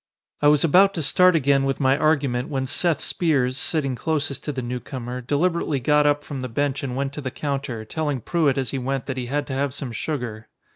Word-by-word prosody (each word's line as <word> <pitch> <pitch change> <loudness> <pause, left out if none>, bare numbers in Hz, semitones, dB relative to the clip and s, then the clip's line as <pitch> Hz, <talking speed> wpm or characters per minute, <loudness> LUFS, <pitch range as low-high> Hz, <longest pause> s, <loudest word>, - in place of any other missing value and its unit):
I 145 - +4
was 150 -1 +5
about 190 +5 +5
to 165 - -1
start 180 +5 +5
again 140 -2 +3
with 135 0 -1
my 135 -1 +3
argument 140 -3 +1
when 135 -3 -1
Seth 160 +3 0
Spears, 135 -7 +1
sitting 140 -2 0
closest 150 0 -2
to 150 - -1
the 130 -3 -4
newcomer, 125 0 -5
deliberately 150 +2 0
got 150 +3 +3
up 145 0 +2
from 140 -3 -6
the 130 - -4
bench 140 +3 -1
and 130 -3 -4
went 135 +1 -2
to 150 - -6
the 130 - -3
counter, 135 -5 -4
telling 145 0 -2
Pruett 145 +2 +1
as 130 -2 -1
he 135 - -2
went 135 +1 -2
that 130 -1 -4
he 125 -1 -3
had 145 +3 -1
to 135 - -6
have 135 0 -1
some 135 -5 -5
sugar. 115 -3 -4
140 Hz, 225 wpm, -23 LUFS, 130-150 Hz, -, was